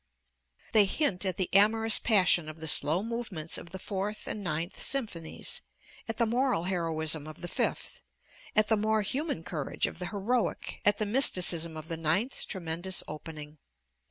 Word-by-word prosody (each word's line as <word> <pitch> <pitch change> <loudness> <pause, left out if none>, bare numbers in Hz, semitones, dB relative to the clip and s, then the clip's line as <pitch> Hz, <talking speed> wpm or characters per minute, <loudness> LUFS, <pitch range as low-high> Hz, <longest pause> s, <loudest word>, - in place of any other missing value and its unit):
They 215 -3 +6
hint 195 - 0
at 185 - -1
the 185 - +1
amorous 220 +3 +5
passion 180 -7 +3
of 155 +1 -10
the 160 - -6
slow 155 +5 +3
movements 220 -9 -3
of 170 - -11
the 190 - -7
Fourth 200 +2 -4
and 210 - -4
Ninth 165 +1 -3
Symphonies, 255 - -2 0.5
at 225 - -3
the 235 - +3
moral 245 -5 +1
heroism 160 -4 -1
of 155 - -11
the 175 - -5
Fifth, - - -2 0.5
at 215 -1 +5
the 220 - +2
more 215 0 +1
human 270 - -2
courage 160 -5 -3
of - - -6
the 180 - -3
'Heroic,' 220 +5 -2
at 205 0 +5
the 215 - -1
mysticism 180 - +3
of 155 0 -8
the 165 -1 -3
Ninth's 165 - 0
tremendous 175 0 -1
opening. 150 0 -9
190 Hz, 165 wpm, -29 LUFS, 160-220 Hz, 0.5 s, They